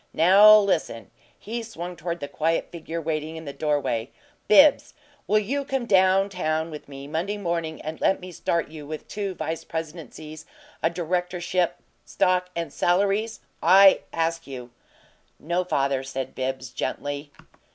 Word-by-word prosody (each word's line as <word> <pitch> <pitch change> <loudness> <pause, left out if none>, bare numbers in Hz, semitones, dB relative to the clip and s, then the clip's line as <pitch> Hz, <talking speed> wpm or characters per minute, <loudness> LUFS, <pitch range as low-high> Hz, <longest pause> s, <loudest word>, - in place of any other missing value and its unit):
Now 200 +6 +8
listen!" 180 - -1 0.3
He 235 +3 -5
swung 180 -6 -7
toward 170 +1 -5
the 145 - -4
quiet 160 +3 -1
figure 165 0 -5
waiting 155 0 -3
in 160 0 -8
the 140 - -6
doorway. 145 -6 -1 0.4
"Bibbs, 285 +8 +5 0.3
will 215 - +3
you 260 +7 -1
come 270 -3 -2
down 190 -2 +4
town 160 -3 -2
with 150 -2 -9
me 140 0 -9
Monday 170 +8 -3
morning 170 -4 -3
and 155 +1 -7
let 195 - +2
me 185 0 -9
start 170 0 -1
you 155 -2 -10
with 155 0 -7
two 200 -3 -4
vice 160 0 -4
presidencies, 155 -1 -7 0.3
a 165 - +2
directorship, 180 +1 -1 0.3
stock, 180 0 +1
and 170 0 -4
salaries? 200 +5 +1 0.2
I 195 +1 +7
ask 165 0 -2
you." 125 -3 -8 0.7
"No, 175 +4 -1
father," 140 -6 0
said 135 -1 -5
Bibbs, 130 -1 -4
gently. 145 +3 -4
165 Hz, 150 wpm, -25 LUFS, 155-190 Hz, 0.7 s, Now